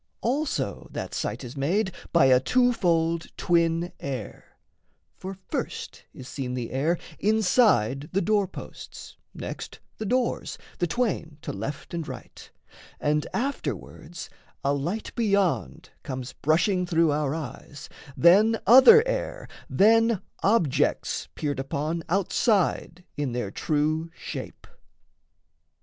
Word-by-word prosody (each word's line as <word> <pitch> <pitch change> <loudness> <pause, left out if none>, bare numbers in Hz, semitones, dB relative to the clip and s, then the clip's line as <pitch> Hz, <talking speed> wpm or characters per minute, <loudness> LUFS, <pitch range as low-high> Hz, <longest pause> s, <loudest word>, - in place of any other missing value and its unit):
Also 275 +5 -1
that - - -6
sight - - -3
is 125 +2 -8
made 190 +9 0 0.2
By 170 -5 +5
a 130 -1 +6
twofold 170 - +2
twin 170 0 +1
air: 130 -7 -7 0.6
for 190 0 -7
first - - -5
is 130 - -11
seen 130 -2 -4
The 120 -2 -4
air 155 +7 +1 0.2
inside 195 - +3
the 195 - +1
door 205 +1 +2
posts; - - -10 0.2
next - - -7 0.2
the 215 - -3
doors, 250 +1 -1 0.2
The 175 - +1
twain 170 -7 -2
to - - -4
left 135 - -6
and 165 -2 -3
right; 130 -4 -10 0.5
and 150 0 0
afterwards 175 - -4 0.4
A 140 - +2
light 170 +10 -3
beyond 200 -6 0
comes 130 -3 -6
brushing 175 +4 +1
through 165 -2 +3
our 145 0 0
eyes, 145 -1 -8 0.3
Then 210 +6 +5
other 270 - +8
air, - - -3 0.2
then 225 0 +4 0.2
objects 195 - +1
peered 145 -3 -2
upon 150 +5 -2
Outside 185 -1 +1
in 145 -4 -2
their 120 -5 -3
true 155 +4 0
shape. - - -7
170 Hz, 120 wpm, -26 LUFS, 145-210 Hz, 0.6 s, other